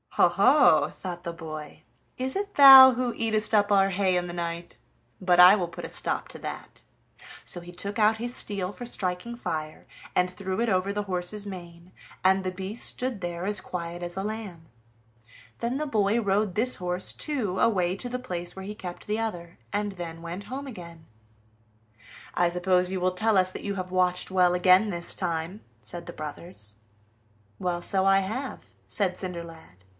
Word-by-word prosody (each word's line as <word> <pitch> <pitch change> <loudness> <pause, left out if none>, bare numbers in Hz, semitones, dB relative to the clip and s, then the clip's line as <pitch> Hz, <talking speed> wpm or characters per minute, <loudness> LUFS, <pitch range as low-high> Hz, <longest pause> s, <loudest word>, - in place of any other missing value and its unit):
"Ho, - - +6
ho!" 155 - +4
thought 175 -2 -7
the 170 - -4
boy, 155 -2 -9 0.3
"is 260 +1 -1
it 405 +1 -3
thou 265 -2 +11
who 245 -1 -2
eatest 220 -1 0
up 205 -1 +3
our 195 -1 +4
hay 190 -1 +1
in 180 0 -2
the 175 - -6
night? 170 0 -5 0.4
but 180 -1 +3
I 180 +3 +10
will 180 -4 -2
put - - -8
a - - -7
stop - - -1
to - - -9
that." - - -8 0.6
So 175 - +2
he 175 +1 -11
took 200 +4 -5
out 220 0 +3
his 240 +2 -5
steel 200 -2 -2
for 245 - -8
striking 190 0 -2
fire, 155 -8 -5 0.3
and 180 0 +2
threw 190 +1 -5
it 235 0 +1
over 190 0 +1
the 205 +1 -2
horse's 190 +2 -3
mane, 175 -2 -10 0.3
and 190 0 +4
the 185 - -2
beast 190 +5 -6
stood 250 -5 -2
there 175 0 -4
as 205 0 +2
quiet 175 0 -6
as 175 +1 -6
a 195 - -2
lamb. 205 -6 -6 0.9
Then 235 +3 -2
the 305 +1 -2
boy 215 -3 +1
rode 200 -2 0
this 250 +4 0
horse, 180 0 -1
too, 230 -12 -2
away 185 -5 +2
to 245 +5 -4
the 250 +1 -3
place 175 -7 -5
where 190 0 -8
he 210 +1 -6
kept 180 -3 -8
the 210 +1 -1
other, 175 -6 -5
and 205 -1 -2
then 165 -2 -7
went 175 +4 -7
home 270 +6 -6
again. 170 -8 -10 1.3
"I 175 0 +2
suppose 180 +1 +1
you 190 - -2
will 185 +1 +1
tell 215 +3 +1
us 185 0 +3
that - - -8
you 200 -1 -3
have 185 -1 -5
watched 180 -1 +1
well 180 -1 +3
again 185 +4 +5
this 170 -2 -1
time," 170 +3 -3 0.2
said 175 -1 -6
the - - -8
brothers. 150 - -9 0.8
"Well, 175 -1 -2
so 190 +1 +1
I 195 0 +5
have," 225 +8 -5 0.2
said 185 -4 -1
Cinderlad. 165 - -8
185 Hz, 190 wpm, -26 LUFS, 175-210 Hz, 1.3 s, thou